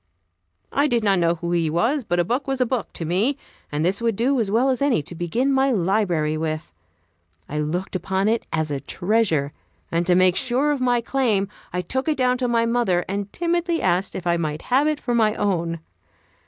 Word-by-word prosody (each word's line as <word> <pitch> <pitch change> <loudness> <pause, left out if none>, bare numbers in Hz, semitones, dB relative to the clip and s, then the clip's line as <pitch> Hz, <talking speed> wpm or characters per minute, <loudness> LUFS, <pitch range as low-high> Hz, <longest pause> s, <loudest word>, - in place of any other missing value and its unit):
I 285 +2 +2
did 235 -5 +1
not 195 -3 +3
know 170 0 +2
who 170 +1 -4
he 170 -2 +1
was, 235 - +1
but 175 -4 -1
a - - +4
book 250 - -2
was 270 -1 -1
a 255 - +3
book 245 -3 -2
to 165 - -5
me, 205 - +1 0.3
and 150 +2 -1
this 190 +5 0
would 230 -2 +1
do 255 +5 +1
as 215 -4 0
well 240 +6 +3
as 255 - -2
any 275 - +2
to 175 - -8
begin 225 +11 0
my 270 +1 +3
library 180 - +1
with. 155 0 -3 0.8
I 150 - -3
looked 175 +6 -3
upon 190 +2 0
it 225 +1 0
as 155 -2 -1
a 140 - -1
treasure, 175 -6 0 0.4
and 170 +1 0
to 180 - +4
make 185 0 +4
sure 260 +5 +1
of 285 -3 -1
my 245 -1 +2
claim, 225 -6 0 0.2
I 180 +1 -2
took 260 - -2
it 305 -2 +1
down 250 -1 +2
to 250 - 0
my 230 -1 +2
mother 230 -7 +1
and 200 +1 -3
timidly 345 0 0
asked 180 +3 0
if 185 - -5
I 170 0 +2
might 155 -2 -3
have 280 +4 +4
it 305 -1 0
for 245 - -2
my 220 -2 +3
own. 170 -5 -1
205 Hz, 220 wpm, -23 LUFS, 175-255 Hz, 0.8 s, a